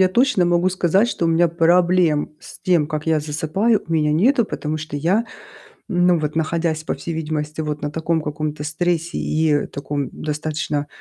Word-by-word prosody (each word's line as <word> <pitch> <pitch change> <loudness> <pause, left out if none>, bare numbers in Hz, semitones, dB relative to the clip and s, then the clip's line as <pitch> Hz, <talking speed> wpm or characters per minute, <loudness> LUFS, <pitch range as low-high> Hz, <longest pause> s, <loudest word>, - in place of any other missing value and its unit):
я 185 - +5
точно 235 -2 +3
могу 175 +1 +2
сказать, 185 +5 +2
что 170 - -1
у - - +2
меня 165 +1 +4
проблем 170 -1 +3
с - - -12
тем, 175 -5 +2
как 155 0 -4
я 160 -2 +2
засыпаю, 160 +9 0
у 165 - -5
меня 150 -2 +2
нету. 235 - +3
Потому 155 -4 -3
что 155 -1 -6
я, 180 +10 +1 0.7
ну 175 -2 +3
вот 150 0 -3
находясь, 160 0 -1
по - - -2
всей 170 - -5
видимости, 150 -1 -3
вот 150 -1 -4
на 145 - -3
таком 160 +1 -1
каком-то 150 0 -4
стрессе 170 +2 -1
и 155 -2 +1
таком 140 -1 -4
достаточно, 150 -1 -3
160 Hz, 180 wpm, -21 LUFS, 150-175 Hz, 0.7 s, я